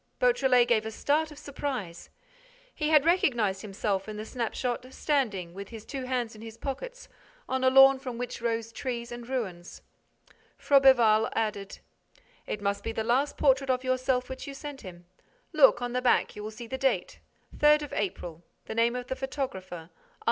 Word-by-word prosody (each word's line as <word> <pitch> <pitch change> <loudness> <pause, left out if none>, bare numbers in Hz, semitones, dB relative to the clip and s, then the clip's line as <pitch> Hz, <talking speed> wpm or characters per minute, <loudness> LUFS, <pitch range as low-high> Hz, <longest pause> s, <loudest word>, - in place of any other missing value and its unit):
Beautrelet 265 - +4
gave 230 -3 +3
a - - -2
start 300 +7 0
of 300 - -12
surprise. 265 -12 -5 0.6
He 300 -1 -1
had 305 -2 +5
recognized 240 - +2
himself 195 -1 -2
in 210 - -6
the 215 - -5
snapshot, 245 +2 -3
standing, 215 - -1
with 200 +1 -8
his 225 -2 -10
two 270 -3 -5
hands 250 -3 -2
in 215 - -13
his 225 0 -10
pockets, - - -6 0.4
on 260 0 -1
a 260 - +6
lawn 270 0 +7
from 255 -3 -6
which 245 -1 -5
rose 230 -1 -2
trees 235 -1 -5
and 240 0 -8
ruins. 190 -9 -5 0.7
Froberval 240 -6 +5
added: 210 -3 -3 0.7
"It 205 - -4
must 200 0 -1
be 225 - -2
the 225 0 -2
last 260 +5 +1
portrait 270 -1 +3
of 255 0 +1
yourself 255 0 0
which 260 +1 -7
you 280 - -7
sent 290 -1 -8
him. 175 -3 -11 0.5
Look, 270 -5 +5
on 245 0 -3
the 250 - 0
back, 250 -1 +2
you 210 - -7
will 210 - -5
see 225 +2 -9
the 265 +3 -5
date, 270 -1 0 0.4
3 300 0 +6
April, 175 -4 -4 0.2
the - - -5
name 230 +2 +2
of 250 0 -4
the 260 - -4
photographer, 260 -10 -4
R. 165 -1 -10
245 Hz, 180 wpm, -28 LUFS, 215-270 Hz, 0.7 s, lawn